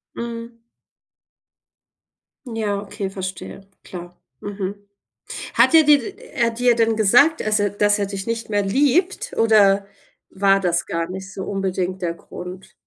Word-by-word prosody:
Mhm. 235 0 -6 1.9
Ja, 220 -4 -2
okay, 205 -1 -5
verstehe, 190 0 -7 0.2
klar. 175 -1 -9 0.2
Mhm. 200 -1 -5 0.8
Hat - - +4
er 320 -1 +8
dir 295 -1 +6
d 235 - -7 0.2
er 235 -2 +2
hat 230 0 -4
dir 245 -1 +4
dann 225 -1 +2
gesagt, 245 +10 +4
dass 215 0 +1
er 205 0 +1
dass 205 +1 +2
er 200 - +1
dich 195 -1 -6
nicht 230 -1 -3
mehr 205 -1 +1
liebt 295 - +1
oder 205 -3 +4 0.4
war 195 0 +3
das 175 -2 0
gar 170 0 -3
nicht 190 +1 -7
so 190 - -5
unbedingt 190 -1 -2
der 170 -2 -1
Grund? 180 +2 -10
205 Hz, 150 wpm, -21 LUFS, 190-230 Hz, 1.9 s, er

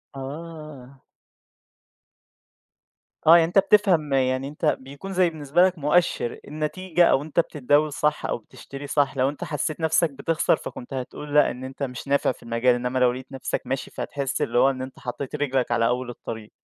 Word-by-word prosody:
آه. 140 -2 -9 2.2
آه، 160 +2 +9
يعني 165 - +4
أنت 180 +4 +4
بتفهم 190 -7 +3
يعني 130 0 +1
أنت 150 +3 -5
بيكون 140 +9 -9
زي 180 -1 +3
بالنسبة 155 +2 +1
لك 185 -1 0
مؤشر، 150 -5 +1
النتيجة 165 +4 0
أو 135 - +3
أنت 155 +2 -2
بتتداول 150 -1 +2
صح 150 +1 0
أو - - -1
بتشتري 135 +4 -10
صح 140 -1 +1
لو 130 +1 +3
أنت 145 - -7
حسّيت 150 +1 -3
نَفْسك 160 +1 +2
بتخسر 160 +4 +1
فكنت 130 -3 -9
هتقول 145 +3 -5
لأ، 150 - +5
إن 125 +1 -8
أنت 130 +2 -6
مش 125 0 -5
نافع 140 -1 +2
في - - -13
المجال 115 +2 +2
إنّما 125 +1 -2
لو 125 -1 +4
لقيت 130 +1 -9
نَفْسك 135 -1 -3
ماشي 135 +1 -3
فتحس 140 -2 -3
اللي 120 - 0
هو 130 +2 +6
إن 130 -1 -3
أنت 130 0 -8
حطّيت 130 +3 -5
رجلك 135 -4 0
على 115 -1 +3
أول 125 +1 -1
الطريق. 110 -2 -8
140 Hz, 175 wpm, -24 LUFS, 130-155 Hz, 2.2 s, آه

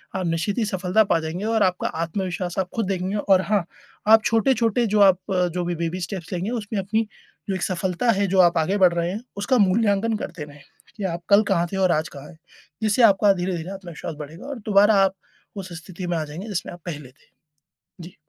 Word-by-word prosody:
आप 190 -1 -2
निश्चित 170 +6 -1
सफलता 190 +2 +2
पा - - +4
जाएँगे 165 +5 -4
और 220 -1 +2
आपका 185 -1 0
आत्मविश्वास 175 +2 -3
आप 185 -1 -1
ख़ुद 225 - 0
देखेंगे। 190 +1 -2
और 195 -2 +3
हाँ, 205 -1 +1 0.4
आप 220 0 +7
छोटे-छोटे, 230 0 +2
जो 210 +1 +1
आप, 190 -2 +6
जो 180 -1 0
भी 175 0 -2
बेबी 170 +2 -3
स्टेप्स 180 0 -5
लेंगे 180 +4 -2
उसमें 215 -3 -3
अपनी, 215 +3 -1 0.4
जो 195 - 0
एक 185 - -5
सफलता 185 +5 0
है, 200 -1 +1
जो 190 0 +1
आप 175 -1 +5
आगे 165 +5 +1
बढ़ 185 -3 +5
रहे 170 0 -1
हैं, 210 +5 -6
उसका 250 +6 +1
मूल्यांकन 210 +1 +2
करते 170 -6 -6
रहें 145 0 -15 0.3
कि 210 - -7
आप 170 - -5
कल 200 +2 +6
कहाँ 175 -2 +2
थे - - -1
और - - +1
आज 155 -2 0
कहाँ 140 +1 -11
हैं। 160 - -15 0.5
जिससे 215 +3 +2
आपका 205 -1 +5
धीरे-धीरे 180 -1 -3
आत्मविश्वास 175 -4 -7
बढ़ेगा 155 - -9
और 280 -4 -6
दोबारा 205 +1 +5
आप 190 0 +1 0.4
उस 190 -3 -7
स्थिति 185 0 -7
में 175 -1 -1
आ 160 - -1
जाएँगे, 160 +8 -8
जिसमें 200 -5 -4
आप 175 - -13
पहले 150 -6 -6
थे। 130 - -28 0.7
जी। 170 +2 -11
190 Hz, 215 wpm, -23 LUFS, 170-205 Hz, 0.7 s, आप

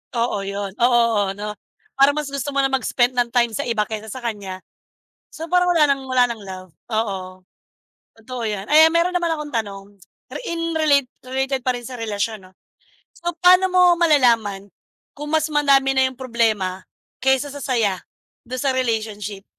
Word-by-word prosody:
Oo 230 -3 0
'yon, 200 0 -4
oo, 240 0 +4 0.3
oo - - -2
no 210 +1 -5 0.5
parang 275 +1 +5
mas 300 -2 -3
gusto 280 0 -4
mo 275 - +2
na 270 - +1
mag-spend 250 -1 0
ng 240 -1 0
time 240 -2 +2
sa - - -2
iba 230 -3 0
kaysa 215 0 -4
sa 250 +4 -8
kanya. 200 -5 -5 0.7
So 325 +1 -7
parang 360 +1 +3
wala 310 -4 +4
ng 270 - -10
wala 255 -1 +3
ng 225 -3 -6
love 185 -1 -9 0.2
oo 190 -4 -3 0.8
totoo 240 +1 -7
'yan 200 -1 -4
ayan 315 +2 +7
meron 345 +2 +2
naman 345 -1 +1
akong 300 -3 -6
tanong 200 -3 -3 0.5
ri - - -5
in 330 0 -2
relate 285 -4 +3 0.2
related 265 +1 -2
pa 255 - +3
rin 240 -1 -8
sa 255 - -7
relasyon 215 -3 -4
'no. - - -28 0.6
So 345 0 -4
paano 365 +1 +6
mo 360 -1 +5
malalaman 230 - +2 0.4
kung 295 +1 -7
mas 315 0 +2
madami 275 -2 +3
na 260 0 +4
'yong 260 - -12
problema 220 -7 -1 0.4
kaysa 265 +2 +2
sa 285 - -7
saya 220 -8 0 0.5
do'n 255 0 -4
sa 275 -2 +1
relationship? 215 -5 -3
250 Hz, 180 wpm, -21 LUFS, 210-285 Hz, 0.8 s, ayan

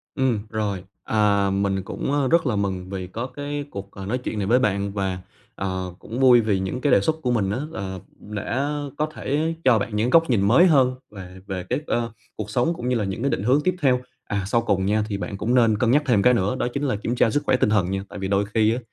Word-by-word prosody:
Ừm, 130 -5 +1
rồi, 105 -4 -2 0.2
à, 100 -2 +2
mình 95 -1 0
cũng, 135 - -4
à, 145 -2 +1
rất 165 -3 +3
là 115 -4 +1
mừng 95 -2 -2
vì 95 -2 -4
có 115 +7 -5
cái 145 +2 -5
cuộc, 100 0 -7
ờ, 95 -1 -8
nói 125 +5 -1
chuyện 115 -3 -4
này 100 - -1
với 120 +4 +4
bạn, 100 -3 0
và, 95 -2 -2 0.4
à, 100 - -3 0.3
cũng 115 +5 -6
vui 125 -2 +7
vì 105 -4 +1
những 95 +7 -3
cái 140 -1 +2
đề - - +6
xuất 155 +10 0
của 125 - 0
mình 105 -5 +1
á 115 - -1
là 95 -1 -5 0.2
đã 115 +7 -3 0.3
có 155 - +1
thể 155 +1 -2
cho 125 -4 +5
bạn 105 +1 -3
những 115 +4 +1
góc 165 -2 +4
nhìn 105 -5 +3
mới 165 - +6
hơn 130 -6 +4 0.2
về 95 -2 -10
về 95 -2 -4
cái, - - 0
ờ, 115 -2 -1 0.2
cuộc 105 -1 -5
sống 125 +10 +1
cũng 125 -5 -4
như 125 - +1
là 105 - 0
những 95 +5 -4
cái 140 - +1
định 95 - -1
hướng 130 +6 +3
tiếp 185 -1 +2
theo. 125 -2 +3 0.2
À, 100 -2 -2
sau 115 +3 +2
cùng 95 -4 0
nha, 105 +1 +1
thì 100 - -2
bạn 100 0 -5
cũng 110 +5 -1
nên 115 -4 +4
cân 115 0 +2
nhắc 145 +4 +4
thêm 110 -6 +3
cái 125 0 +5
nữa 100 -2 0
đó - - 0
chính 140 - -2
là 130 -7 0
kiểm 115 +3 -3
tra 115 - +3
sức 145 +6 0
khỏe 130 - +4
tinh 105 - +2
thần 95 -4 +2
nha. 95 0 -2
Tại - - -9
vì 95 - -3
đôi 100 +1 +2
khi 110 0 +4
á, - - -3
110 Hz, 270 wpm, -23 LUFS, 100-130 Hz, 0.4 s, vui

